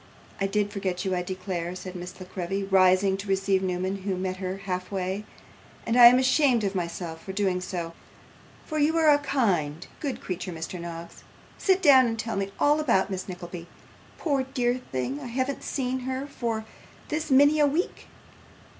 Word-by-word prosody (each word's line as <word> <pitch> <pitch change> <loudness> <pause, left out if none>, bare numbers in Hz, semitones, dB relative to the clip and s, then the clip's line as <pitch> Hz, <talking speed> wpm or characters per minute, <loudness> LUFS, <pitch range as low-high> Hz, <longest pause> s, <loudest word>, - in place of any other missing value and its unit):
'I 195 - +1
did 205 +1 0
forget 190 -3 -3
you, 190 -1 0
I 180 - 0
declare,' 180 -1 -4
said 185 0 -8
Miss 180 +1 -8
La 185 - -7
Creevy, 190 +2 -3
rising 190 0 +4
to 200 +1 -7
receive 195 0 +1
Newman, 185 +1 -1
who 190 -1 -3
met 185 0 -3
her 185 0 -4
half 180 -1 -3
way, 190 +2 -2 0.6
'and 230 - 0
I 245 -1 +11
am 245 +1 +7
ashamed 260 -2 +3
of 195 -1 0
myself 170 -2 -4
for 190 - -7
doing 190 -2 0
so; 175 -3 -4 0.7
for 310 -1 -3
you 310 +3 +3
are 315 -2 +6
a 290 - +5
kind, 185 - 0
good 280 -4 -3
creature, 185 0 -5
Mr. 165 +2 -6
Noggs. 170 0 -8 0.4
Sit 380 0 +2
down 265 -5 +7
and 225 -1 -2
tell 225 +1 -3
me 195 0 -1
all 295 +1 +4
about 210 -10 +2
Miss 190 0 -4
Nickleby. 175 -1 -7 0.5
Poor 285 -5 0
dear 250 -1 -1
thing! 130 +2 -2
I - - -7
haven't 260 +3 -2
seen 260 -1 -2
her 260 +2 -3
for 230 -6 -3 0.4
this 310 +1 -2
many 285 +3 +5
a 295 - +5
week. 315 +6 -2
195 Hz, 185 wpm, -26 LUFS, 185-260 Hz, 0.7 s, I